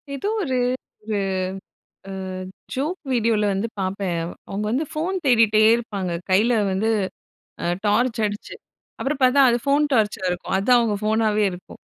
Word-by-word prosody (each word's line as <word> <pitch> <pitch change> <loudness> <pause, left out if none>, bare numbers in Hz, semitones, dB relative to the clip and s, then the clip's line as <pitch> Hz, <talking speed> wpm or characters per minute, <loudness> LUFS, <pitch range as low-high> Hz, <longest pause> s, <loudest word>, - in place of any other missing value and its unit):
எதோ 340 +10 -2
ஒரு 260 -5 -1 0.5
ஒரு 210 -2 -1 0.9
அ - - -5 0.6
ஜோக் 305 +8 -2
வீடியோல 225 -3 +2
வந்து 200 +4 -1
பாப்பேன். 190 -2 -2
அவ் 170 - -6 0.2
அவுங்க 205 +2 -3
வந்து 275 +7 0
ஃபோன் 340 +5 -2
தேடிட்டே 225 -4 +5
இருப்பாங்க. 205 -6 -4 0.2
கையில 225 +5 +4 0.2
வந்து 205 +4 0 0.8
அ - - 0 0.2
டார்ச் 225 +3 +2
அடிச்சு. 205 0 -6 0.5
அப்புறம் 280 +1 -2
பாத்தா, 255 +2 +5
அது 240 - +2
ஃபோன் 285 +1 +3
டார்ச்சா 215 -4 +1
இருக்கும். 180 - -3
அதான் 240 +6 +4
அவுங்க 215 -3 0
ஃபோனாவே 215 -1 +2
இருக்கும். 180 - -11
220 Hz, 145 wpm, -23 LUFS, 205-255 Hz, 0.9 s, தேடிட்டே